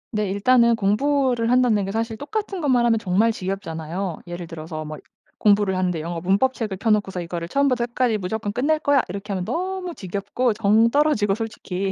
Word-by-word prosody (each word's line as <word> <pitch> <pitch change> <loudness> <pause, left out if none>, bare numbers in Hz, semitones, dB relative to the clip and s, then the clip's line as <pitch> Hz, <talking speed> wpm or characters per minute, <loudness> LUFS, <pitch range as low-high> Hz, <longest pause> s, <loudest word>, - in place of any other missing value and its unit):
네, 210 -2 0
일단은 235 +4 +4
공부를 240 +3 +1
한다는 245 -5 +3
게 195 - -4
사실 225 0 -2
똑같은 400 - -4
것만 255 -6 +2
하면 225 -2 +3
정말 210 +3 +2
지겹잖아요. 185 -3 -4
예를 175 0 -6
들어서 160 -1 -7
뭐 155 0 -7 0.4
공부를 205 -2 +3
하는데 180 -3 0
영어 170 +1 -4
문법 195 +9 +2
책을 215 -6 -4
펴 225 +3 0
놓고서 195 -4 0
'이거를 170 0 -5
처음부터 255 +1 +1
끝까지 240 -2 0
무조건 205 +2 -3
끝낼 290 +8 +1
거야.' 285 -3 +3
이렇게 200 +3 -6
하면 185 -2 -2
너무 365 - -3
지겹고 200 +6 -2
정 220 +2 +3
떨어지고 280 -7 +2
솔직히 195 -3 -4
210 Hz, 425 characters per minute, -22 LUFS, 185-250 Hz, 0.4 s, 일단은